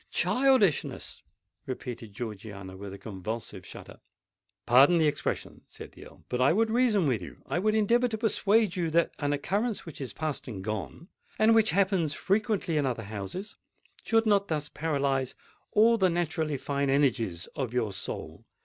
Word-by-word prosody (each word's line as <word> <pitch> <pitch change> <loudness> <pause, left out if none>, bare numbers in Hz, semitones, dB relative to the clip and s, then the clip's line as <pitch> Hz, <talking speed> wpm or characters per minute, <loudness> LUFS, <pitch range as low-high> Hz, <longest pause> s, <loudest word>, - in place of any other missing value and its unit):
"Childishness!" 255 - +1 0.5
repeated 120 -4 -6
Georgiana, 100 -3 -7
with 100 +1 -8
a 100 - -8
convulsive 105 0 -6
shudder. - - -11 0.7
"Pardon 135 +8 +6
the 160 - +3
expression," 150 -1 -2
said - - -11
the - - -13
Earl; - - -18
"but 125 0 -2
I 135 +5 +5
would 220 +3 +2
reason 225 -6 +3
with 125 -8 +1
you—I 90 - -5
would 215 +3 +1
endeavour 235 +3 +3
to 225 -2 -3
persuade 215 -2 +2
you 170 -3 0
that 170 +1 +2
an 145 -1 0
occurrence 200 +10 -1
which 165 -4 -9
is 130 - -4
past 155 -3 -4
and 100 -6 -6
gone, 110 - -5 0.3
and 220 +1 +5
which 225 -1 +4
happens 185 -6 +1
frequently 200 -5 0
in 145 - +2
other 120 -3 -2
houses, 110 - -6 0.5
should 225 0 +2
not 200 -2 +3
thus 150 -2 -2
paralyse 140 -4 -1 0.4
all 225 +2 +5
the 190 -1 +4
naturally 160 -3 -1
fine 140 +1 -1
energies 115 - +1
of 130 -6 -2
your 115 -5 -1
soul. 95 - -7
150 Hz, 165 wpm, -28 LUFS, -, 0.7 s, Pardon